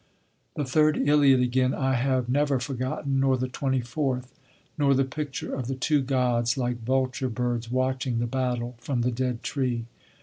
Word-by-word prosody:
The 145 - -1
third 150 +4 +3
Iliad 140 -3 +5
again 130 +1 +2
I 130 -1 0
have 130 -1 +1
never 140 +1 +2
forgotten, 135 +1 -2
nor 135 -1 +3
the 130 +1 -1
twenty 130 0 -1
fourth; 125 +1 -2 0.4
nor 140 -2 +3
the 135 - +3
picture 145 +1 -5
of 130 -3 -3
the 135 - -2
two 145 +3 +1
gods, 125 -2 +1
like 120 -2 -2
vulture 130 +1 0
birds, 120 -1 -2
watching 130 -1 0
the 120 - 0
battle 125 -1 -2
from 125 0 -2
the 125 - +1
dead 125 0 -2
tree. 125 -4 -1
130 Hz, 170 wpm, -26 LUFS, 125-135 Hz, 0.4 s, Iliad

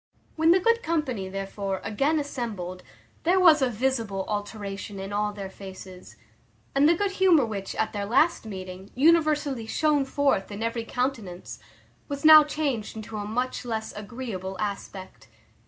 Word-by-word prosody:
When 320 +1 +3
the 355 +2 +6
good 465 +4 +2
company, 260 - -2
therefore, 195 0 -4
again 275 +10 +1
assembled, 215 -11 -5 0.4
there 360 +3 +3
was 325 -5 +6
a 260 - +3
visible 225 -5 -1
alteration 205 -1 -5
in 195 +1 -6
all 210 0 0
their 200 -2 -6
faces; 190 -1 -11 0.6
and 280 +2 +5
the 340 - +5
good 400 +3 0
humour 365 -8 +4
which, 200 -3 -5
at 220 - -1
their 205 -1 -2
last 305 +10 +3
meeting, 190 -2 -8
universally 295 -4 +2
shone 295 +2 +2
forth 270 -8 0
in 205 +2 -5
every 230 0 -2
countenance, 230 -9 -4 0.5
was 280 0 -5
now 310 -1 +10
changed 285 -8 -2
into 220 0 -7
a 205 - -4
much 250 +5 -2
less 220 -2 -4
agreeable 205 -4 -6
aspect. 195 -2 -6
225 Hz, 155 wpm, -26 LUFS, 200-290 Hz, 0.6 s, now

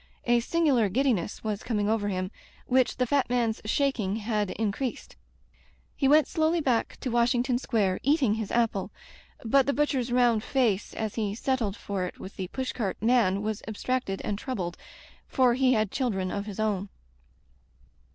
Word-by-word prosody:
A 240 0 +4
singular 260 -5 +2
giddiness 225 -4 0
was 210 -2 -2
coming 210 -3 -1
over 215 -1 +1
him, 185 -1 -2 0.3
which 255 -1 +2
the 250 - +2
fat 275 +1 +1
man's 235 -3 0
shaking 220 -5 0
had 210 -2 -1
increased. 225 +5 -3 0.8
He 275 - +1
went 300 +2 +5
slowly 320 0 +1
back 255 -7 0
to 255 - -2
Washing 240 +1 +2
ton 245 -1 0
Square, 205 -8 0
eating 280 -5 +3
his 220 -2 -3
apple. 230 -5 +1 0.6
But 270 +4 +4
the 280 - +2
butch 295 +1 +1
er's 250 -2 -1
round 240 -3 +3
face 230 -8 0
as 220 -2 -3
he 210 -3 -2
settled 230 -4 -1
for 200 -4 -3
it - - -8
with 190 - -9
the 185 - -4
pushcart 240 -3 -3
man 220 -4 +2
was 215 -1 -2
abstracted 220 -2 -2
and 205 -1 -2
troubled, 185 -10 -4 0.5
for 255 -3 +3
he 255 +1 +3
had 215 -3 +1
children 195 -8 -1
of 200 +1 -4
his 205 0 -7
own. 205 -2 -1
230 Hz, 170 wpm, -27 LUFS, 205-255 Hz, 0.8 s, went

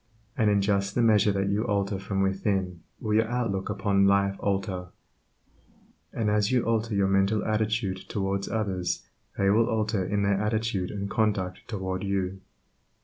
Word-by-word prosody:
And 110 -3 +2
in 100 -1 +3
just 100 -1 0
the 120 - +3
measure 105 -2 +4
that 100 0 0
you 100 +2 +1
alter 100 -3 -1
from 95 0 -1
within 95 -2 -1 0.2
will 110 -2 -2
your 110 +1 +3
outlook 115 -6 -2
upon 100 -1 +2
life 100 0 +3
alter; 95 -2 -2 1.2
and 110 - -2
as 105 +1 +2
you 125 -2 +2
alter 115 -1 0
your 100 -1 +3
mental 95 +2 +2
attitude 110 -2 0
towards 100 -1 -2
others 95 -5 -2 0.3
they 100 0 +3
will 115 +2 +4
alter 110 -3 0
in 100 +2 -1
their 100 0 +1
attitude 105 -3 -1
and 100 -1 -4
conduct 100 -4 -1
toward 95 -4 -3
you. 95 -1 -2
100 Hz, 160 wpm, -27 LUFS, 95-110 Hz, 1.2 s, measure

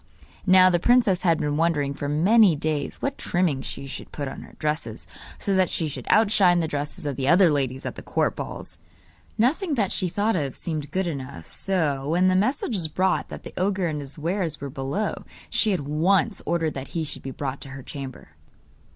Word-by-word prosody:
Now 185 0 +7
the 175 - +2
princess 225 -3 +4
had 165 -3 +3
been 145 0 -1
wondering 155 -4 +1
for 145 0 -4
many 185 +5 +5
days 150 -1 -2
what 275 0 -2
trimming 175 -7 +1
she 140 - -5
should 135 - -7
put 145 -2 -4
on - - -7
her - - -13
dresses, 155 +1 -3 0.3
so 200 - -1
that 185 -2 +3
they 165 - 0
should 145 - -6
outshine 200 -5 +5
the 165 - 0
dresses 145 0 -4
of 140 -3 -2
the 135 -1 -1
other 175 +2 +6
ladies 135 -2 -1
at - - -3
the - - -9
court - - 0
balls. - - -7 0.6
Nothing 290 - +1
that 205 -6 0
she 180 - -1
thought 205 +5 0
of 140 -6 -2
seemed 155 -4 -4
good 190 0 -1
enough, 140 -5 -5
so, 150 -8 -1
when 180 +3 +3
the 185 - +2
message 235 +6 +1
was 170 -5 0
brought 185 +5 0
that - - -8
the - - -9
ogre 190 0 +1
and 150 -2 -3
his 140 +1 -7
wares 165 0 -2
were 140 -1 -6
below, 135 +12 -2 0.4
she 215 - +2
at 185 -5 0
once 175 +8 +1
ordered 165 -2 0
that 135 0 -6
he 165 - 0
should 150 - -6
be 135 - -6
brought 135 0 -4
to 135 - -6
her 135 0 -8
chamber. 135 - -8
165 Hz, 210 wpm, -25 LUFS, 145-190 Hz, 0.6 s, Now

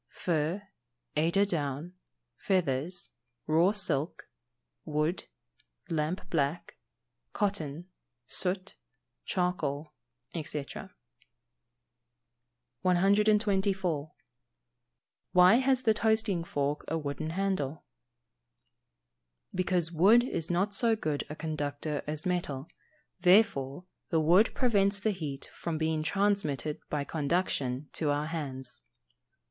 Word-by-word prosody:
_ - - -56
Fur, 170 +3 -1 0.5
eider 170 +6 +3
down, 150 -2 -3 0.4
feathers, 175 -1 -1 0.3
raw 165 +5 +4
silk, 170 -7 0 0.5
wood, 155 +3 -1 0.6
lamp 165 +3 -2
black, 150 +1 -1 0.6
cotton, 175 -6 -2 0.4
soot, 185 +7 0 0.5
charcoal, 155 -5 -1 0.4
&c. 150 -3 -3 2.2
124. 195 -4 +2 1.2
Why 180 +4 +7
has 260 0 +2
the 220 -3 +4
toasting 220 -5 +1
fork 145 -1 -1
a 165 - -1
wooden 150 0 -3
handle? 165 -5 -2 1.7
Because 180 -2 +1
wood 200 +9 +6
is 165 -10 -3
not 190 +4 +1
so 225 +3 +3
good 155 -9 -2
a 150 - -5
conductor 150 -1 -3
as 150 0 -2
metal, 165 -6 -2 0.5
therefore 180 -5 +3 0.2
the 165 - +2
wood 175 +8 +5
prevents 200 -5 +3
the 215 +2 +1
heat 150 -8 -5
from 165 -2 -3
being 160 0 0
transmitted 160 -6 0
by 150 -1 -1
conduction 145 -3 -1
to 155 - 0
our 145 +1 +1
hands. 135 -7 -3
165 Hz, 95 wpm, -30 LUFS, 150-195 Hz, 2.2 s, Why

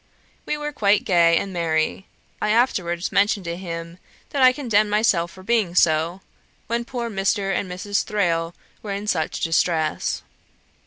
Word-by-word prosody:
We 300 - -1
were 295 0 -4
quite 210 -7 +2
gay 170 -2 +4
and 195 - -3
merry. 165 +2 -1 0.3
I 210 - 0
afterwards 185 -7 +1
mentioned 205 0 +2
to 170 0 -3
him 170 -1 -7 0.3
that 280 - -1
I 255 0 +8
condemned 225 -6 +1
myself 205 -5 +2
for 185 +1 -14
being 205 -5 +1
so, 170 +2 +2 0.4
when 235 +1 -2
poor 240 -1 -4
Mr. 195 -1 0
and 185 0 -2
Mrs. 200 +3 -1
Thrale 175 -6 -1 0.3
were 205 -2 -4
in 200 +1 -4
such 160 -7 -1
distress. 165 -1 0
195 Hz, 155 wpm, -22 LUFS, 170-215 Hz, 0.4 s, I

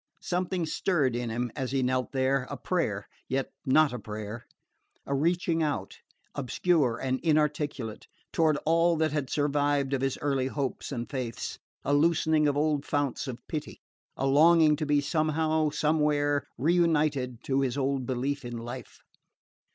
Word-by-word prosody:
Something 180 -1 -1
stirred 155 -5 +1
in 120 -1 -2
him 120 +1 -2
as 130 -2 -3
he 135 -1 +1
knelt 130 0 0
there 130 -1 +1
a - - -5
prayer, - - -1 0.2
yet 135 +1 -1 0.2
not 150 +1 +4
a 125 - -4
prayer 110 +2 -7 0.6
a 140 - -2
reaching 165 +3 +1
out, 150 -2 -2 0.3
obscure 140 -2 +1
and 130 +1 -1
inarticulate, 150 -7 0 0.3
toward 155 -2 +3
all 165 +2 +4
that 155 -1 +1
had 145 -3 -2
survived 145 -1 +1
of 135 - 0
his 135 -1 0
early 135 -3 0
hopes 135 0 -3
and 120 -3 -3
faiths, 125 -4 -4 0.3
a 140 - +1
loosening 155 0 +3
of 145 0 +1
old 150 -1 +1
founts 145 -1 -1
of 125 -2 -7
pity, 155 -2 -5 0.4
a 135 - -1
longing 155 +2 +6
to 155 - -2
be 145 -1 +3
somehow, 155 +1 +1
somewhere 150 -1 +1
reunited 150 -6 +1
to 135 0 +1
his 135 -1 -1
old 135 -2 -1
belief 135 +3 -2
in 120 -1 -5
life. 120 +1 -8
145 Hz, 155 wpm, -28 LUFS, 130-155 Hz, 0.6 s, longing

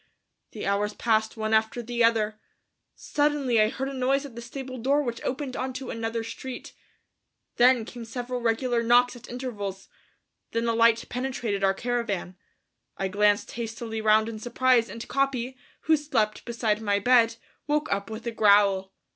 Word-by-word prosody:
The 215 - -5
hours 205 +1 0
passed 220 -1 +1
one 220 0 -1
after 220 +2 +1
the 240 0 0
other; 220 -2 +2 0.6
suddenly 290 -6 +1
I 215 - +4
heard 270 +3 -4
a 275 - -5
noise 270 +2 +1
at 265 -5 -10
the 235 - -7
stable 255 +1 -7
door 280 +5 +2
which 240 -3 -4
opened 265 0 -3
onto 260 0 -4
another 225 0 -3
street. 250 +2 -7 0.8
Then 245 -2 +5
came 240 0 -8
several 245 +2 -5
regular 235 +1 +1
knocks 245 +2 +4
at 240 - -12
intervals. 205 -6 -5 0.6
Then 230 +1 0
a 230 - +2
light 230 0 +4
penetrated 245 -6 -2
our 195 0 +3
caravan. 230 -6 -2 0.6
I 195 - -1
glanced 205 +1 +2
hastily 225 -1 -5
round 215 0 +4
in 225 -1 -6
surprise 245 0 +2
and 230 - -7
Capi, 265 -2 -1 0.3
who 320 - +4
slept 245 -8 -1
beside 225 -2 -1
my 205 -2 +1
bed, 230 +1 +4 0.3
woke 300 0 0
up 200 +1 -3
with 220 +1 -7
a 235 - -1
growl. 200 -3 +3
230 Hz, 165 wpm, -26 LUFS, 215-255 Hz, 0.8 s, Then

